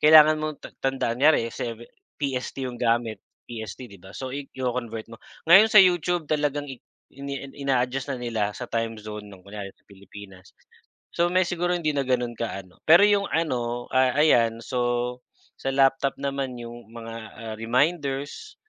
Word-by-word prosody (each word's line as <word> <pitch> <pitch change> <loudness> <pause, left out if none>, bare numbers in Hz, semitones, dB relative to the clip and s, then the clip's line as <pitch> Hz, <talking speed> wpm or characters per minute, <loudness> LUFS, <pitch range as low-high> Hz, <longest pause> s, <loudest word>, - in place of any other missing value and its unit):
kailangan 155 0 +8
mong 155 -1 -3
ta - - -6
tandaan, 130 -3 -1
kunyari 140 -6 +4
sa 120 - -4 0.5
PST 135 -1 -3
yung 125 -2 -6
gamit, 115 -3 +1 0.3
PST 115 +2 -7
'di 100 - -13
ba, 95 +1 -14
so 130 -1 -5
iko-convert 125 -5 -4
mo. 115 - -11 0.3
Ngayon 195 +5 +10
sa 210 - +10
YouTube 175 -2 +2
talagang 145 -1 0
i 130 - -8 0.3
ini 140 0 -6 0.2
ina-adjust 135 0 0
na 135 - -2
nila 110 -4 -2
sa 125 - -5
time 115 -1 -1
zone 105 0 -8
ng 95 -2 -14
kunyari 100 0 -7
sa - - -35
Pilipinas. 95 -1 -14 0.6
So 170 - +2
may 185 0 +4
siguro 175 0 0
hindi 155 -3 0
na 140 - +1
gano'n 125 -2 0
kaano, 95 -5 -5
pero 170 +5 +8
yung 205 -1 +3
ano, 120 -7 -1
ah, 130 -1 +3
ayan 115 -7 +4
so 125 -1 -1 0.4
sa 135 - -2
laptop 135 0 +3
naman 140 -2 -2
yung 120 -1 -9
mga, 115 -1 -8 0.2
ah, 115 -1 -6
reminders, 140 - -1
125 Hz, 165 wpm, -25 LUFS, 115-145 Hz, 0.6 s, Ngayon